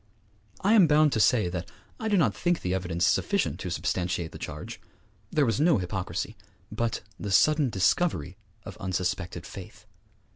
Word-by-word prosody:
I 205 +3 +3
am 200 -7 +7
bound 150 0 +4
to - - +1
say 110 -3 +4
that 90 0 -5 0.3
I 220 - -3
do 205 -2 +2
not 130 - +3
think 175 - 0
the 90 - -1
evidence 90 -2 0
sufficient - - +1
to - - -4
substantiate 90 -2 -2
the - - -10
charge. - - -7 0.5
There 150 -2 +2
was 115 +1 0
no 160 -3 +4
hypocrisy, 95 0 -3 0.4
but 115 -1 -2 0.2
the 105 - -4
sudden 150 +7 +4
discovery 95 - +1 0.3
of - - -9
unsuspected 90 -2 -3
faith. 105 +3 -11
105 Hz, 160 wpm, -27 LUFS, -, 0.5 s, am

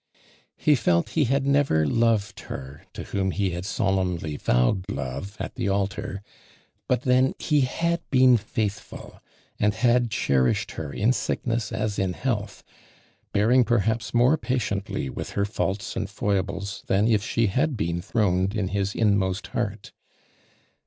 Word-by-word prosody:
He 150 - +3
felt 85 -10 +2
he 155 -3 +1
had 135 +2 +1
never 140 - +3
loved 115 +4 +1
her 70 +2 -8
to - - -6
whom 95 -1 -1
he 95 0 0
had 85 +2 -5
solemnly 90 -6 -1
vowed 70 +10 +1
love 70 +6 -5
at - - -5
the - - -2
altar, 100 0 -2 0.6
but 125 -1 +1
then 130 +1 +3
he 150 -2 +2
had 170 +6 0
been 130 -2 +6
faithful, 105 -1 -4 0.4
and 105 0 +2
liad 120 +1 +2
cherished 65 -10 +1
her 75 -3 -6
in 110 - +2
sickness 115 -3 -2
as 105 -1 -2
in 95 -2 -1
hcaltli, 105 -6 -3 0.7
bearing 120 +5 +4
perhaps 115 -1 0
more 125 +6 +4
patiently 105 - -2
with - - -6
her 100 - +1
faults 100 -1 -3
and 105 -4 -3
foibles 100 -1 -2
than 100 +3 +2
if 110 -3 +2
she 115 +1 +1
liaclbeen 105 - -1
throned 95 -2 +1
in 100 -4 -1
his 100 0 -1
inmost 100 -3 +1
heart. 105 -4 -3
105 Hz, 145 wpm, -25 LUFS, 95-120 Hz, 0.7 s, been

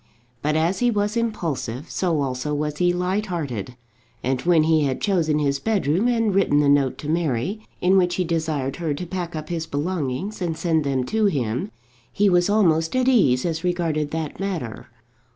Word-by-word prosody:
But 150 +1 0
as 165 +4 +1
he 245 - +3
was 210 -1 0
impulsive, 165 - -3
so 170 -5 0
also 135 +3 -2
was 150 0 -2
he 175 0 +3
light 185 +4 -1
hearted, 125 - -4 0.5
and 130 0 0
when 170 -3 +4
he 155 -1 +3
had 130 -2 -1
chosen 165 -7 +1
his 140 -2 0
bedroom 200 - +1
and 230 -4 +1
written 185 -7 +3
the 145 - +3
note 140 -2 +3
to 145 - -7
Mary, 160 - -1 0.2
in 185 +2 +4
which 180 -1 +2
he 185 - 0
desired 155 -5 -2
her 160 -4 -2
to 180 - -5
pack 175 -1 -4
up 155 0 -6
his 165 -2 -3
belongings 165 +5 -3
and 165 -3 -2
send 160 -3 +1
them 135 -2 0
to 215 - 0
him, 135 - 0 0.4
he 205 0 +3
was 175 +1 +3
almost 165 -4 +2
at 255 0 +2
ease 145 - +4
as 165 -1 -2
regarded 165 -4 0
that 160 -1 -4
matter. 175 - -4
165 Hz, 190 wpm, -23 LUFS, 145-185 Hz, 0.5 s, when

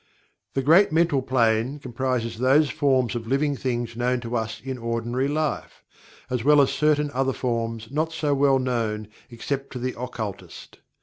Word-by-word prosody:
The 135 - 0
Great 165 +8 +5
Mental 160 -3 +2
Plane 120 0 +1
comprises 125 -3 -3
those 140 +4 +4
forms 130 -5 +1
of 115 -2 -5
"living 140 +3 +1
things" 120 -3 -3
known 125 +1 0
to 120 0 -4
us 110 -1 -2
in 130 -1 -6
ordinary 115 +3 -1
life, 150 +1 -3 0.4
as 125 -3 -2
well 150 +2 +6
as 140 - +4
certain 150 0 +1
other 135 0 0
forms 115 -2 -3
not 155 +3 -1
so 150 -3 0
well 135 -1 +4
known 115 -5 -2 0.2
except 135 +3 -4
to - - -5
the 125 +1 -3
occultist. 115 -5 -7
130 Hz, 165 wpm, -24 LUFS, 115-140 Hz, 0.4 s, well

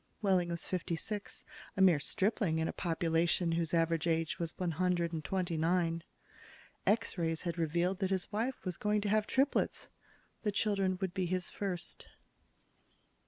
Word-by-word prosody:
Wehling 185 -3 +3
was 170 -1 -3
fifty 180 -2 -1
six, 205 +5 -5 0.3
a - - +2
mere 180 -6 +6
stripling 195 - 0
in 160 0 +1
a - - -3
population 170 0 +1
whose 165 -1 0
average 165 -1 +2
age 165 -1 0
was 170 -1 -3
one 180 -2 0
hundred 175 0 +1
and 160 -1 -3
twenty 180 -2 -1
nine. 165 0 +1 0.9
X 210 -3 +2
rays 165 -1 0
had 170 0 -3
revealed 170 +4 +1
that 190 -2 0
his 190 0 -1
wife 230 +4 -2
was 180 -2 -3
going 210 0 +1
to 205 - -1
have 215 0 +2
triplets. 275 +2 +1 0.5
The 210 - 0
children 195 -3 +1
would 190 -2 -1
be 185 -2 0
his 180 +1 -1
first. 190 -3 -4
180 Hz, 165 wpm, -33 LUFS, 165-195 Hz, 0.9 s, mere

